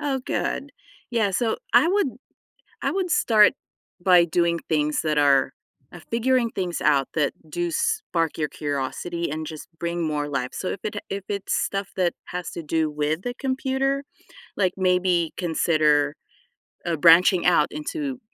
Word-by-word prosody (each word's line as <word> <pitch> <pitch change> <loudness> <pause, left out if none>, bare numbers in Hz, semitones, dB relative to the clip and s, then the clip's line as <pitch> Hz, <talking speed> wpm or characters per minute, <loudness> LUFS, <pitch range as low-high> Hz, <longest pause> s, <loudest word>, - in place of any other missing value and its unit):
Oh, 275 -3 -1
good. 285 - -2 0.4
Yeah, 220 -4 +1
so 220 +4 0 0.2
I 335 - +6
would 400 -4 +2 0.7
I - - +1
would 370 -2 -2
start 215 -7 +5 0.5
by 180 -2 +6
doing 170 0 +1
things 150 -1 +1
that 155 -1 0
are 140 -2 +4 0.4
uh, 175 - -10
figuring 235 +1 +2
things 180 -5 -3
out 140 -3 +2
that 150 -3 +1 0.2
do 175 +2 -2
spark 185 - -1
your 150 - 0
curiosity 150 +5 -3
and 155 +1 -4
just 155 -1 -8
bring 170 0 -2
more 150 -1 -2
life, 130 -3 -2
so 185 - -4
if 195 - -4
it 215 - -3
ha - - -3
if 195 0 -4
it's 200 -1 -2
stuff 195 0 -1
that 180 -2 +2
has 180 -1 -5
to 170 - -6
do 160 0 0
with 150 +3 -1
the 245 +3 -4
computer, 265 +1 -1 0.6
like 185 -3 +2
maybe 180 -3 +2
consider, 155 -4 +2 0.7
uh, 170 -1 0
branching 170 +3 +6
out 170 -4 +4
into 265 - -4
175 Hz, 160 wpm, -24 LUFS, 155-215 Hz, 0.7 s, I